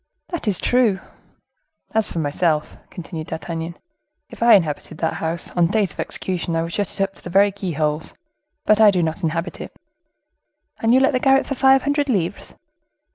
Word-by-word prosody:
"That 345 -10 -5
is 200 -4 +2
true." 240 -6 +2 0.9
"As 220 -1 +2
for - - -6
myself," 155 0 0
continued 165 -3 -7
D'Artagnan, 165 +1 -5 0.5
"if - - -12
I 235 -1 +7
inhabited 155 -3 -1
that 160 - -1
house, 165 +1 -3
on 175 -2 +2
days 200 -2 +1
of - - -23
execution 175 -2 -3
I 165 - +1
would 165 0 -6
shut 205 -2 -1
it - - +1
up 195 0 -3
to - - -16
the - - -7
very 200 +3 +4
keyholes; 160 -5 -3 0.5
but 215 +1 +4
I 215 - +8
do 180 -3 +1
not 160 +2 -2
inhabit 165 +1 -3
it." - - -9 1.0
"And 225 - +2
you 255 - +6
let 270 +1 +3
the 255 - +2
garret 270 +1 +3
for - - -3
five 265 0 +4
hundred 285 0 0
livres?" 190 -5 -2
185 Hz, 185 wpm, -21 LUFS, 165-220 Hz, 1.0 s, I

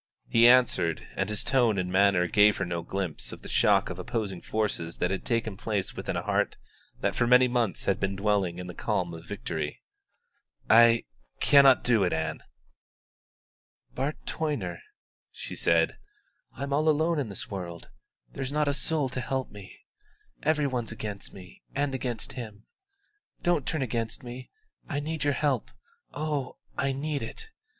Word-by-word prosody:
He 115 0 +6
answered, 120 -10 +4
and - - -1
his 105 -1 0
tone 120 -6 +3
and 90 -1 -1
manner 95 -2 +4
gave 105 +3 +5
her 95 - -1
no 85 -1 -3
glimpse 95 -1 -3
of - - -10
the - - -8
shock - - +3
of - - -7
opposing 100 -6 -3
forces 100 -6 -2
that 90 - 0
had 95 - -2
taken 115 -4 -1
place 105 -4 -2
within - - -3
a - - -2
heart - - 0 0.4
that - - +1
for 120 - +2
many 125 +1 +6
months 120 -6 0
had 95 -2 +1
been 95 0 -1
dwelling 100 -3 +1
in 90 - -6
the 90 - -7
calm 85 +1 -1
of 80 +1 -10
victory. - - -4 0.8
"I 115 +1 +6 0.4
cannot 140 -2 +6
do 115 -5 +3
it, 90 - +1
Ann." 80 -1 -2 1.5
"Bart 140 +4 -2
Toyner," 115 - -2 0.5
she - - -8
said, 80 -1 +2 0.5
"I'm 140 +2 -4
all 155 +2 +3
alone 160 +1 +2
in 130 -6 -2
this 100 - -6
world; 85 -3 -6 0.4
there's 135 -1 -4
not 150 0 +1
a 145 - +2
soul 150 -1 0
to 130 +1 -3
help 130 0 -2
me. 100 -2 -11 0.7
Every 150 -1 +2
one's 125 -5 -2
against 105 -2 -6
me 90 -2 -13
and 140 0 0
against 125 -3 -3
him. 110 -4 -8 0.8
Don't 175 -6 +1
turn 155 -4 0
against 115 -1 -3
me; 125 +1 -8 0.4
I 145 -3 -1
need 155 0 -3
your 145 - +3
help 135 -4 0 0.4
oh, 145 -3 -3 0.2
I 140 0 0
need 145 +2 -2
it! 445 0 -7
115 Hz, 165 wpm, -28 LUFS, 95-140 Hz, 1.5 s, He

